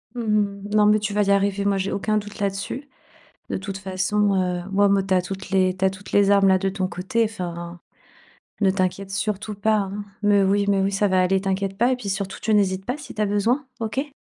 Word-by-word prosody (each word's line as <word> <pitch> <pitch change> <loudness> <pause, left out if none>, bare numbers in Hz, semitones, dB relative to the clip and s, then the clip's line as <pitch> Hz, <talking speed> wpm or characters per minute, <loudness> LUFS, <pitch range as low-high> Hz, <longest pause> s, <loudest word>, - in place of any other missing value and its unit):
Mmh 240 - -3
mh. 205 -2 0
Non, 210 -1 +5
mais 210 +1 +5
tu 210 -1 -3
vas 210 0 +2
y 200 - +1
arriver, 200 0 +1
moi, 200 -1 +2
j'ai 190 +1 -2
aucun 215 +2 0
doute 205 0 -6
là-dessus. 200 +8 -3 0.6
De - - -1
toute 195 0 -5
façon, 195 +2 0
heu, 180 -1 0
moi 200 +1 +3
me 200 0 +3
tu 190 - +1
as 180 - +3
toutes 190 +1 -7
les 185 -1 +2
tu 190 - -15
as - - +6
toutes 190 +1 -11
les 200 -1 +4
armes 200 -1 +5
là 190 0 +5
de 195 +1 -1
ton 190 -1 -2
côté. 190 +6 -1
Enfin, 175 -5 -6 0.8
ne 195 -2 +4
t'inquiète 190 0 -1
surtout 210 +1 -2
pas 215 +2 +1
hein. 200 +1 -3 0.2
Mais 205 -1 +4
oui 200 +1 +2
mais 200 -1 +3
oui, 195 +1 0
ça 200 +1 +2
va 185 -1 +3
aller, 190 +1 +2
t'inquiète 195 0 -2
pas 240 +5 +3
et 255 - +1
puis 235 -5 -7
surtout, 195 0 -3
tu 220 - +1
n'hésites 190 -2 +1
pas 250 - -2
si 295 -3 -10
tu 215 - -5
as - - +2
besoin. 225 +8 0
OK? 260 +6 -2
200 Hz, 245 wpm, -23 LUFS, 190-210 Hz, 0.8 s, as